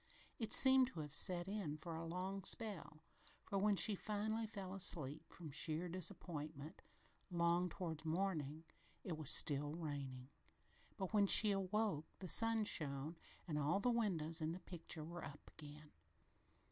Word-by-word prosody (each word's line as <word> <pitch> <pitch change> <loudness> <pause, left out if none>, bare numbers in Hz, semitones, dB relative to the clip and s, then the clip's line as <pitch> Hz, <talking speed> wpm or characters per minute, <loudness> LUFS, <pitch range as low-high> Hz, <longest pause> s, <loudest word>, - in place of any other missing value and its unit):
It 225 -2 -3
seemed 265 -1 +8
to 175 -10 -7
have 150 -2 -8
set 175 +2 +4
in 195 -7 -4
for 165 +2 -7
a 165 +1 -5
long 185 +3 -4
spell, 195 -8 -3 0.4
for 200 - -2
when 205 +1 +2
she 210 +2 +4
finally 215 +2 -2
fell 195 -3 -7
asleep, 160 -5 -3
"from 160 -4 -9
sheer 155 +4 -1
disappointment, 160 -4 -4 0.5
'long 175 0 +1
towards 160 -3 -5
morning," 160 -3 -2 0.4
it 175 - -4
was 155 -3 -3
still 145 0 +5
raining, 140 -5 -6 0.7
but 190 +1 -4
when 205 -2 +4
she 210 +1 +7
awoke 195 -4 -1
the 185 - -7
sun 225 +4 +5
shone 150 -4 -2 0.3
and 150 -3 -2
all 150 +7 +1
the 245 +4 +1
windows 175 -8 -1
in 160 +1 -1
the 180 - -7
picture 170 -2 -6
were 170 +2 -8
up 145 +1 -10
again. 150 0 -11
170 Hz, 155 wpm, -40 LUFS, 155-195 Hz, 0.7 s, seemed